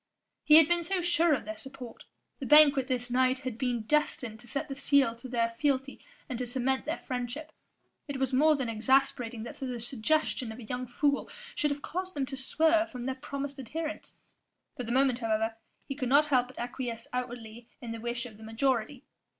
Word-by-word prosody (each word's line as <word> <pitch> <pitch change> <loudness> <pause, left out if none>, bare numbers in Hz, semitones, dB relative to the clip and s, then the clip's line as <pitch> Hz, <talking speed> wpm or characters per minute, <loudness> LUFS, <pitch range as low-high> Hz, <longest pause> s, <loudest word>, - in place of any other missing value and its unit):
He 305 - +7
had 320 -1 +9
been 345 0 +2
so 365 +1 -1
sure 340 -1 +3
of 255 - -6
their 215 0 -6
support; 265 -4 -10 0.3
the 270 - -4
banquet 285 -3 +7
this 245 -2 -2
night 255 +1 +3
had 255 -4 -4
been 240 -2 -1
destined 250 -4 0
to 240 - -13
set 280 - -3
the 275 - -5
seal 275 -4 +3
to 235 - -9
their 230 -2 0
fealty 275 -2 0 0.2
and 255 -5 -4
to 250 - -2
cement 265 +2 -1
their 315 - -2
friendship: 250 +3 -5 0.6
it 285 -2 -4
was 265 0 -1
more 305 +4 +5
than 265 -4 -2
exasperating 235 0 +1
that 235 - -8
the 255 -3 -4
suggestion 250 +1 0
of 220 - -9
a 250 - -9
young 250 +3 -4
fool 280 +4 0 0.2
should 295 - +1
have 285 0 -4
caused 370 +1 -4
them 280 -2 0
to 270 +1 -6
swerve 320 +5 +2
from 245 -2 -6
their 265 - -1
promised 280 0 -6
adherence. 310 +5 -5 0.6
For - - -5
the 235 -1 -4
moment 260 -1 +3
however, 225 -1 0 0.3
he 275 - -3
could 260 -3 -3
not 285 +3 +6
help 255 -4 +2
but 255 - -15
acquiesce 240 -1 -4
outwardly 240 -2 -5
in 235 - -6
the 230 -1 -6
wish 240 +1 -2
of 220 -4 -10
the 220 - -13
majority. 245 +3 -1
260 Hz, 205 wpm, -30 LUFS, 240-285 Hz, 0.6 s, had